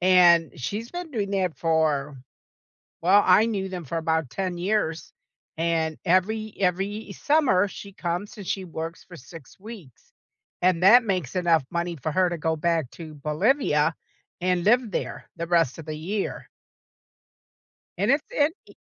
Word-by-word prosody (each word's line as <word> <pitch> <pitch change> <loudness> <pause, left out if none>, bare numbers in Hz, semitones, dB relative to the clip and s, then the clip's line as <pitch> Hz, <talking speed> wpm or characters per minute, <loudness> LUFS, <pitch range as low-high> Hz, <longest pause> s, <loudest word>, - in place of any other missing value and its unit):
And 175 -4 +5
she's 210 - -4
been 350 -2 -6
doing 210 -7 -2
that 185 -4 0
for 155 -4 0 0.9
Well, 195 +4 +5
I 190 +5 +5
knew 195 -4 -2
them 180 -3 -6
for 165 +5 -3
about 160 -4 -1
10 185 +3 -3
years, 175 -3 -1 0.4
and 160 -1 0
every 210 +5 +1
every 195 +3 -1
summer, 270 - +2
she 200 +1 -10
comes 180 +2 -4
and 200 -4 -9
she 190 - -2
works 165 -1 -6
for 175 - -12
6 145 -1 -13
weeks, 195 - -12 0.5
and 180 -1 +2
that 240 +5 +8
makes 185 - -2
enough 170 -5 +3
money 170 0 -2
for 150 +3 -4
her 185 +1 +3
to 175 - -4
go 160 +1 0
back 165 -3 0
to 160 -2 -10
Bolivia 155 - +1 0.5
and 180 -1 +1
live 235 +1 +3
there - - -4
the 170 - -4
rest 165 -6 +2
of 165 - -9
the 155 -1 -5
year. 195 +6 -4 1.5
And - - +2
it's 285 +2 +2
int 295 +3 +1
e - - -14
180 Hz, 160 wpm, -25 LUFS, 160-200 Hz, 1.5 s, that